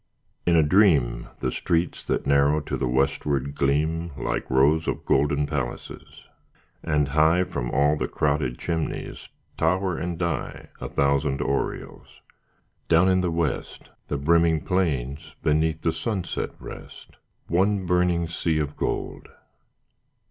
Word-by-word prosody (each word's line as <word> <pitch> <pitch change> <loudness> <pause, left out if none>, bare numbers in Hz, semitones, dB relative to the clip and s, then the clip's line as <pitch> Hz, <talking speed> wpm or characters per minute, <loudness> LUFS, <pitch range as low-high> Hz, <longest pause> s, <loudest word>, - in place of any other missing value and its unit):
In 85 - +4
a 80 - +5
dream 75 - +3
The - - 0
streets 85 0 -1
that - - -1
narrow 70 +2 +3
to - - -4
the 65 - -1
westward 70 +2 0
gleam 80 +5 0
Like - - -3
rows 75 +5 +3
of - - -3
golden 75 +1 +2
palaces; 70 -5 -6 0.6
and 75 -2 0
high 80 +5 +4
From - - -4
all 70 +2 +3
the - - -2
crowded 70 -4 0
chimneys 80 -2 -4 0.3
tower 95 -2 +1
and 85 0 -3
die 85 -1 -3
A - - -5
thousand 70 0 +1
aureoles. 70 -1 -3 0.7
Down 85 +3 +4
in 95 0 +3
the 90 - 0
west 80 -4 -3 0.2
The 70 - -2
brimming 80 +2 +3
plains 75 -8 -2
beneath 80 +1 +1
the 80 - +2
sunset 105 -6 -3
rest, - - -11 0.3
One 95 +3 +1
burning 90 -1 +1
sea 85 -1 -1
of 75 -1 -2
gold. - - -3
75 Hz, 135 wpm, -25 LUFS, 70-85 Hz, 0.7 s, a